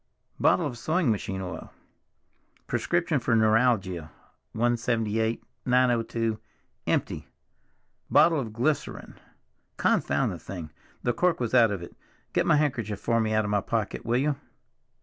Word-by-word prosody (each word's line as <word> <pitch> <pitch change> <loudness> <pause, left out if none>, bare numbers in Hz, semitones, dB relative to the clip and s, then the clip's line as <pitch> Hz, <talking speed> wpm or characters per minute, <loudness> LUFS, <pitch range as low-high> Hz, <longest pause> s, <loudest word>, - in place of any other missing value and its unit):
Bottle 170 - +3
of 125 -5 -4
sewing 160 -3 +1
machine 95 -2 -3
oil. 90 -1 -7 0.9
Prescription 170 -4 0
for 120 -1 +1
neuralgia, 110 -7 +2 0.4
178, 115 -1 0 0.2
902, 115 -3 +1 0.5
empty. - - -1 0.8
Bottle 165 -2 +5
of 115 -5 -4
glycerine—confound 135 +8 -2
the - - -6
thing! 85 -5 -7 0.3
the 120 - +1
cork 180 +7 +1
was 120 -2 -2
out 120 -3 +6
of 100 -4 -4
it; - - -11 0.4
get - - +1
my - - +5
handkerchief 120 -9 0
for 115 +1 +1
me 110 -1 0
out 110 0 +2
of 105 - -2
my 105 -1 +2
pocket, 110 0 -2
will 120 +2 +1
you? 140 +1 +1
115 Hz, 130 wpm, -27 LUFS, 110-125 Hz, 0.9 s, out